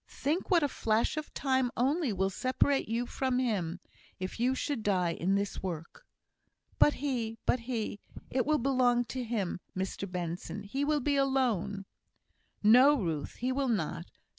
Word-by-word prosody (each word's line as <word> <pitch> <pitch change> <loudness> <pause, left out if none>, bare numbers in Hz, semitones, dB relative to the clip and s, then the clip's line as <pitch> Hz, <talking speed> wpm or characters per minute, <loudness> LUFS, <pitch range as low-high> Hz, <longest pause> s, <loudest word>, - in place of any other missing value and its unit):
Think 315 +6 -2
what 345 -4 +4
a - - +3
flash 225 -3 0
of 310 0 -5
time 260 -2 +1
only 275 +2 +1
will 195 0 0
separate 260 +4 +1
you 235 +2 0
from 260 +1 -1
him, 195 -9 -1 0.4
if 185 +4 -5
you 255 +2 +2
should 270 -2 -2
die 185 -5 +1
in 190 +4 0
this 200 0 -2
work!" 175 - -6 0.7
"But 295 - +6
he 230 -5 -1
but 250 - +2
he 220 -4 -2 0.3
it 255 0 0
will 305 0 +4
be 275 +2 0
long 245 -2 +3
to 255 +2 -4
him, 215 -7 -2 0.2
Mr 190 0 -3
Benson! 180 +3 -4
He 265 +8 -2
will 295 0 +1
be 285 +2 +1
alone!" 240 -8 +1 0.8
"No, 250 +7 +7
Ruth, 160 -7 -3
he 255 +2 -1
will 270 0 0
not. 170 -5 -1
240 Hz, 165 wpm, -31 LUFS, 195-265 Hz, 0.8 s, No